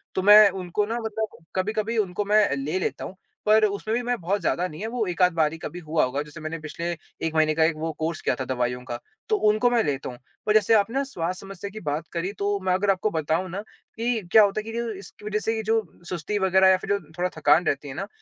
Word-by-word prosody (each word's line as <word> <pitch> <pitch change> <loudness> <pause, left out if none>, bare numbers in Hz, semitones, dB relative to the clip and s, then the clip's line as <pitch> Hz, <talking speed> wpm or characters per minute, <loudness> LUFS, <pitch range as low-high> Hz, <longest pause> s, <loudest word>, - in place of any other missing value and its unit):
तो 190 - +1
मैं 210 +1 +9
उनको 185 +2 -2
ना 230 +3 -3
मतलब 220 -1 -4 0.2
कभी-कभी 215 +4 -1
उनको 205 -1 0
मैं 210 +1 +5
ले 150 +7 -2
लेता - - -3
हूँ। 190 - -8 0.3
पर 215 +1 +5
उसमें 210 +2 -2
भी 245 - 0
मैं 245 0 0
बहुत 195 +4 -1
ज़्यादा 180 +1 0
नहीं 155 +4 -10
है 220 - -2
वो 230 -2 -1
एक-आध 180 0 +2
बारी 160 -1 +1
कभी 175 +2 -7
हुआ 155 +1 +2
होगा। 135 +3 -2
जैसे 150 0 -12
मैंने 155 +1 -4
पिछले 170 +3 -4 0.4
1 160 - -5
महीने 155 -1 +3
का 160 - +3
एक 160 0 +2
वो 160 +1 -2
कोर्स 160 +1 -2
किया - - +1
था 130 - -2
दवाइयों 125 -1 -1
का 120 -2 -5 0.3
तो 435 - +4
उनको 215 +3 +3
मैं 240 -2 +2
लेता 140 -2 -2
हूँ। 125 - -9 0.3
और 210 - +4
जैसे 215 +1 +4
आपने 225 +6 +2
स्वास्थ्य 180 -6 -4
समस्या 195 0 -7
की 215 +2 -8
बात 150 -1 -3
करी 180 +3 -2
तो 200 0 0
मैं 185 -1 +2
अगर 195 +2 +2
आपको 195 +2 0
बताऊँ 160 +3 -1
ना 195 +4 -4 0.3
कि 230 0 0
क्या 220 -1 +8
होता 200 +1 +1
है - - -4
कि 225 - -7
जो 235 0 -2
इसकी 205 - -14
वज़ह 210 0 -1
से 225 +1 -1
ये 220 - -3
जो 225 +1 +2 0.3
सुस्ती 180 +4 -2
वग़ैरह 190 0 +4
या 190 - +5
फिर - - -9
जो 200 0 +2 0.2
थोड़ा 180 +1 0
थकान 155 +3 +4
रहती 145 +1 -1
है 135 - -6
ना, - - -4
190 Hz, 255 wpm, -25 LUFS, 160-215 Hz, 0.4 s, मैं